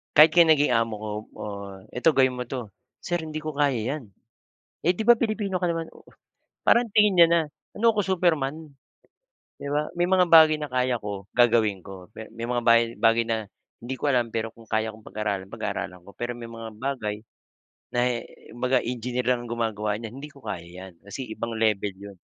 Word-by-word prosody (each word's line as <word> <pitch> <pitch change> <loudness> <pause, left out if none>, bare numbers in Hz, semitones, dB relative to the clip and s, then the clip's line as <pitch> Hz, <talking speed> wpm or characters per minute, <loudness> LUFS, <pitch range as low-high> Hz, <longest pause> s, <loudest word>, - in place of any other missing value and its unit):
kahit 155 +2 +9
kaya 175 - +9
naging 145 -3 +4
amo 115 -1 +1
ko, 110 - -4 0.3
"Oh 100 -1 -6 0.3
eto, 125 +6 +4
gawin 130 -3 +3
mo 125 - -3
'to." 125 -2 -6 0.3
"Sir 175 - -2
hindi 155 -1 -5
ko 155 -1 -6
kaya 140 -4 +2 0.2
yan." 150 - -8 0.8
"Eh, 175 - +4
di 215 +5 -4
ba, 240 - +9
Pilipino 215 -4 -2
ka 180 -1 0
naman?" 165 -1 -3
Oo. - - -16 0.6
Parang 235 0 +4
tingin 210 -1 +4
niya 170 - +10
na, 170 0 +4 0.4
ano 230 +2 +4
ko 210 - 0
Superman, 160 -6 0 0.9
di - - -9
ba? 150 +1 0
May 175 - +3
mga 180 -1 +3
bagay 155 -2 +7
na 150 - -4
kaya 125 -1 0
ko 100 -2 -6
gagawin 115 -5 +3
ko. 95 -1 -10
Pe 110 - -9
may 115 +1 -6
mga 120 0 -1
bagay 115 0 +5 0.2
bagay 115 0 +4
na 115 -1 0 0.4
hindi 120 +3 -5
ko - - -4
alam, 125 -5 +2
pero 115 0 -3
kung 115 -1 -17
kaya 110 0 0
kong 110 - -15
pag-aralan, 100 -3 -3
pag-aaralan 90 -2 -5
ko, 100 - -12
pero 120 0 -4
may 115 -1 -8
mga 115 -1 -8
bagay 120 -5 -3 0.8
na - - +2
eh 120 -2 -1 0.2
kumbaga 125 +2 +1
engineer 125 +1 -3
lang 120 -1 -1
ang 120 - -8
gumagawa 110 -2 -1
niyan 115 +3 -7
hindi 145 - -7
ko 140 -2 -18
kaya 90 -6 -5
yan, 90 +1 -11
kasi 130 +6 -5
ibang 115 +1 -4
level 105 -3 0
yun. 100 0 -11
120 Hz, 200 wpm, -25 LUFS, 110-155 Hz, 0.9 s, niya